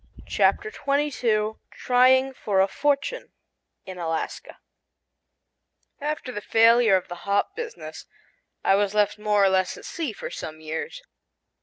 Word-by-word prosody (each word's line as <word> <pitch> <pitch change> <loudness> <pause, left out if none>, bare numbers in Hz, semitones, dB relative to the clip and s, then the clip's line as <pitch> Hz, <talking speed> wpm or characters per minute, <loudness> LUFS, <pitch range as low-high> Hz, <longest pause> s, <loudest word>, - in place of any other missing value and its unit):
] - - -18
CHAPTER 430 +1 +1
TWENTY 290 -4 -1
TWO 220 -4 0
TRYING 260 +1 +3
FOR 205 -6 -1
A 190 - +4
FORTUNE 290 - -1 0.5
IN 185 -1 -8
ALASKA 165 -1 -4 1.4
AFTER 295 -3 -4
the 210 - -5
failure 230 -1 +5
of 185 - -1
the 175 +3 -9
hop 205 - +1
business, 470 0 -8 0.6
I - - +4
was 200 +1 +1
left 210 0 +1
more 210 -1 +2
or 195 - +5
less 190 -1 0
at - - -12
sea 320 -7 -4
for 210 - -8
some 155 0 -7
years. 160 - -6
215 Hz, 145 wpm, -24 LUFS, 195-275 Hz, 1.4 s, failure